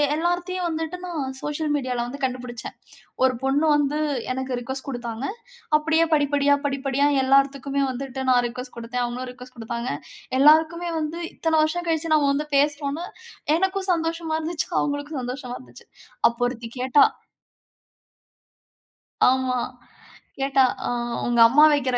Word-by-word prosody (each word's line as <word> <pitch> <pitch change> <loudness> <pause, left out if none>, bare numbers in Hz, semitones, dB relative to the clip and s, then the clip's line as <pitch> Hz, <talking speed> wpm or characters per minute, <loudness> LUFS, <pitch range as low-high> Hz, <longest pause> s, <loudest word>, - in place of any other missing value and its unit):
எல்லார்த்துக்குமே 350 +3 -1
வந்துட்டு 320 +2 -3
நான் 280 -7 -4
சோசியல் 295 0 -2
மீடியால 250 -4 -1
வந்து 275 +2 -8
கண்டுபிடிச்சேன். 250 -2 -4 0.5
ஒரு 255 -1 +4
பொண்ணு 285 +4 +2
வந்து 295 +1 0 0.3
எனக்கு 260 -1 -3
ரிக்வொஸ்ட் 265 +3 -5
குடுத்தாங்க. 240 -1 -5 0.5
அப்படியே 320 +2 +2
படிப்படியா 285 -1 +3
படிப்படியா 275 0 0 0.2
எல்லார்த்துக்குமே 275 +1 +2
வந்துட்டு 265 +1 -5
நான் 245 -1 +4
ரிக்வெஸ்ட் 250 +1 -8
கொடுத்தேன். 240 +1 -2
அவங்களும் 250 +1 -4
ரிக்வெஸ்ட் 250 0 -14
குடுத்தாங்க. 235 +1 -4 0.5
எல்லாருக்குமே 320 +4 +5
வந்து 310 +2 -3 0.2
இத்தனை 325 -1 0
வருஷம் 350 +3 -2
கழிச்சு 325 -1 +1
நாம 295 -2 +3
வந்து 300 +2 -1
பேசுறோம்ன்னு 290 +3 0 0.5
எனக்கும் 380 +1 0
சந்தோஷமா 330 -1 -2
இருந்துச்சு. 320 0 -2
அவங்களுக்கும் 290 0 -3
சந்தோஷமா 250 0 -5
இருந்துச்சு. 125 0 -15 0.4
அப்போ 235 +1 0
ஒருத்தி 235 -2 -6
கேட்டா. 260 +7 +5 2.3
ஆமா. 260 -1 0 0.8
கேட்டா 270 0 +3 0.2
ஆ - - -1 0.4
உங்க 240 -1 +1
அம்மா 280 +6 +5
வைக்கிற 255 -3 +1
275 Hz, 130 wpm, -24 LUFS, 255-315 Hz, 2.3 s, எல்லாருக்குமே